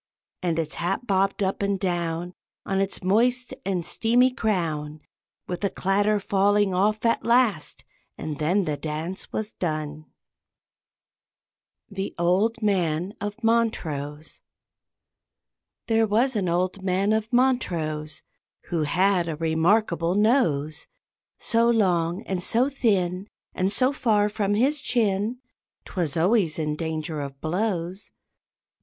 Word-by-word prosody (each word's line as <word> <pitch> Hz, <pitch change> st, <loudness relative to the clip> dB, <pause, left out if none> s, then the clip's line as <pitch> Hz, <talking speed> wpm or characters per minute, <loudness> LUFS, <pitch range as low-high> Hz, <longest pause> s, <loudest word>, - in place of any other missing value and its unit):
And 170 Hz, -3 st, 0 dB
its 160 Hz, -2 st, -2 dB
hat 175 Hz, +8 st, -2 dB
bobbed 195 Hz, -1 st, +1 dB
up 190 Hz, +1 st, -1 dB
and 200 Hz, -1 st, 0 dB
down 175 Hz, -2 st, -2 dB, 0.3 s
On 195 Hz, 0 st, 0 dB
its 195 Hz, -1 st, -3 dB
moist 245 Hz, +6 st, +2 dB
and 180 Hz, -3 st, -2 dB
steamy 245 Hz, +6 st, +3 dB
crown, 160 Hz, -, -2 dB, 0.5 s
With 180 Hz, +2 st, -5 dB
a 200 Hz, -, +2 dB
clatter 205 Hz, +3 st, +1 dB
falling 200 Hz, 0 st, +2 dB
off 210 Hz, +4 st, +1 dB
at 230 Hz, -, +2 dB
last, 235 Hz, -9 st, +1 dB, 0.3 s
and 155 Hz, -2 st, -5 dB
then 180 Hz, +6 st, +1 dB
the 150 Hz, -2 st, -2 dB
dance 160 Hz, +5 st, -4 dB
was 215 Hz, 0 st, -3 dB
done. 155 Hz, -2 st, -4 dB, 1.8 s
THE 195 Hz, -1 st, -5 dB
OLD 195 Hz, +7 st, +1 dB
MAN 180 Hz, -2 st, 0 dB
OF 205 Hz, +3 st, -5 dB
MONTROSE. 160 Hz, -11 st, -1 dB, 1.4 s
There 225 Hz, -1 st, +2 dB
was 235 Hz, +5 st, +2 dB
an 190 Hz, -4 st, 0 dB
old 185 Hz, +3 st, 0 dB
man 190 Hz, +2 st, +1 dB
of 220 Hz, +1 st, -1 dB
Montrose 170 Hz, -, 0 dB, 0.5 s
Who 170 Hz, -2 st, 0 dB
had 180 Hz, +3 st, +2 dB
a 160 Hz, -, -2 dB
remarkable 170 Hz, +2 st, +1 dB
nose, 165 Hz, -, +1 dB, 0.5 s
So 230 Hz, 0 st, +2 dB
long 180 Hz, -4 st, +1 dB
and 185 Hz, -2 st, -3 dB
so 240 Hz, +8 st, +2 dB
thin, 195 Hz, -7 st, 0 dB, 0.3 s
And 185 Hz, +2 st, 0 dB
so 255 Hz, +6 st, +2 dB
far 210 Hz, -6 st, +2 dB
from 205 Hz, -1 st, 0 dB
his 275 Hz, +6 st, +2 dB
chin, 220 Hz, -3 st, 0 dB, 0.5 s
'Twas 170 Hz, -5 st, -2 dB
always 180 Hz, -2 st, +2 dB
in 150 Hz, -2 st, -1 dB
danger 160 Hz, -1 st, -3 dB
of 140 Hz, -1 st, -7 dB
blows. 180 Hz, +2 st, -2 dB
190 Hz, 125 wpm, -25 LUFS, 165-215 Hz, 1.8 s, steamy